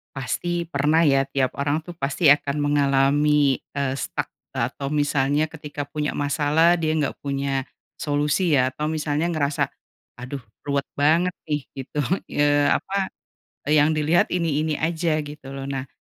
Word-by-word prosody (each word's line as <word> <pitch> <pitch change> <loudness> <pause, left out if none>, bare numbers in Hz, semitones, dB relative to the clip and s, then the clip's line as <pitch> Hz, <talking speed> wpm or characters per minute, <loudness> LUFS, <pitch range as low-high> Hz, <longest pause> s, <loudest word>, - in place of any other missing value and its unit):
Pasti 170 +6 -2
pernah 160 +1 +2
ya 135 -2 +3
tiap 135 -2 0
orang 145 +3 0
tuh 175 - -8
pasti 145 -1 +3
akan 145 -1 +2
mengalami, 145 0 +3 0.2
eee, 135 -1 -1
stuck - - -3 0.2
e - - +1
atau 140 - -5
misalnya 145 0 +1
ketika 150 -2 -6
punya 150 +1 -3
masalah 150 +4 +3
dia 155 -1 0
nggak 145 -4 -1
punya, 140 -1 -2 0.3
solusi 150 +3 +1
ya, 130 -1 +3
atau 150 +3 -3
misalnya 155 0 -1
ngerasa, 155 -4 0 0.5
"Aduh, 125 +3 -6 0.2
ruwet 140 -1 -1
banget 165 +5 +3
nih," 150 -3 -3
gitu, 135 +2 -5 0.3
eee, 145 0 +3
apa, 195 -1 -1 0.5
e 150 - 0
yang 155 +2 +3
dilihat 155 +3 +3
ini-ini 155 -3 0
aja, 160 -1 0
gitu 145 -2 -9
loh. 135 - -5
Nah, 135 -1 -4
145 Hz, 150 wpm, -23 LUFS, 140-155 Hz, 0.5 s, ya